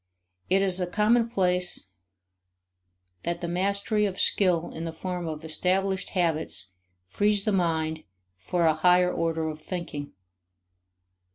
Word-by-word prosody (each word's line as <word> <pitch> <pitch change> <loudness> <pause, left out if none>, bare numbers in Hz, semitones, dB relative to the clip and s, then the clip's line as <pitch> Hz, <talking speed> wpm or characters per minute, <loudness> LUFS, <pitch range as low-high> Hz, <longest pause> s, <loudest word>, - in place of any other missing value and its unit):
It 195 +2 +3
is 190 -1 +2
a 180 - 0
commonplace 210 -4 +1 1.4
that 170 0 -2
the 170 - -3
mastery 200 +4 +1
of 190 -1 -5
skill 175 -4 +2
in 160 - -6
the 165 - -3
form 180 +1 -4
of 155 0 -6
established 190 +4 0
habits 155 - 0 0.3
frees 205 - +1
the 215 - +1
mind 160 -4 0 0.4
for 170 - 0
a 160 - +5
higher 180 +3 +4
order 165 -1 -1
of 155 0 -6
thinking. 160 -6 -6
180 Hz, 125 wpm, -27 LUFS, 160-195 Hz, 1.4 s, a